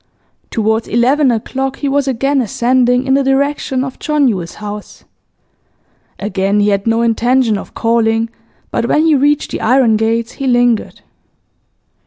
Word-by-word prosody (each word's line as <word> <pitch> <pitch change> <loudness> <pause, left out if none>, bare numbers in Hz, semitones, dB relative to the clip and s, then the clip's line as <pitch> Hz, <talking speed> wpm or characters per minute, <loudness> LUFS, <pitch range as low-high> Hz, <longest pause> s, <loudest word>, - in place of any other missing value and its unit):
Towards 220 0 -1
eleven 260 +5 +2
o'clock 265 +3 -2
he 285 - -4
was 280 0 0
again 270 +2 0
ascending 250 +2 +1
in 265 - +1
the 275 - +3
direction 270 -1 0
of 265 -1 -7
John 300 -2 +1
Yule's 185 -7 -3
house. 210 0 -8 1.2
Again 200 0 -1
he 205 0 +2
had 200 +1 -1
no 230 +1 +2
intention 235 0 +2
of 200 - -8
calling, 225 0 +1 0.4
but 235 - -1
when 310 +5 +2
he 320 - +4
reached 290 +1 +1
the - - -4
iron 240 -2 +3
gates 225 +1 -1
he 275 - -5
lingered. 245 -2 +1
240 Hz, 150 wpm, -15 LUFS, 225-270 Hz, 1.2 s, he